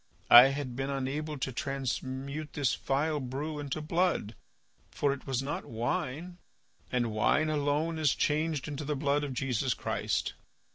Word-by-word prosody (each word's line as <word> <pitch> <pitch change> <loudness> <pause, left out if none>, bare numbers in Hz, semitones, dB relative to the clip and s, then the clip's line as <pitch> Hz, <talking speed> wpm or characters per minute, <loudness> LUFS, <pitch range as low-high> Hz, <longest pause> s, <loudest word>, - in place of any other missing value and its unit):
I 120 +1 +12
had 135 -2 -3
been 135 +2 -2
unable 140 +3 -2
to 130 0 -2
transmute 135 +2 -3
this 140 -5 +1
vile 150 +3 0
brew 145 +4 -4
into 145 +1 -3
blood, 165 - 0 0.6
for 140 -1 +1
it 140 - -10
was 135 -1 0
not 145 +2 -3
wine, 140 +9 -3 0.5
and 120 -3 +1
wine 150 +9 +2
alone 150 +2 0
is 155 -2 +3
changed 155 -1 0
into 150 0 -4
the 150 +1 -1
blood 145 +1 +1
of 140 -3 -4
Jesus 125 -3 0
Christ. - - -1
140 Hz, 150 wpm, -30 LUFS, 130-150 Hz, 0.6 s, I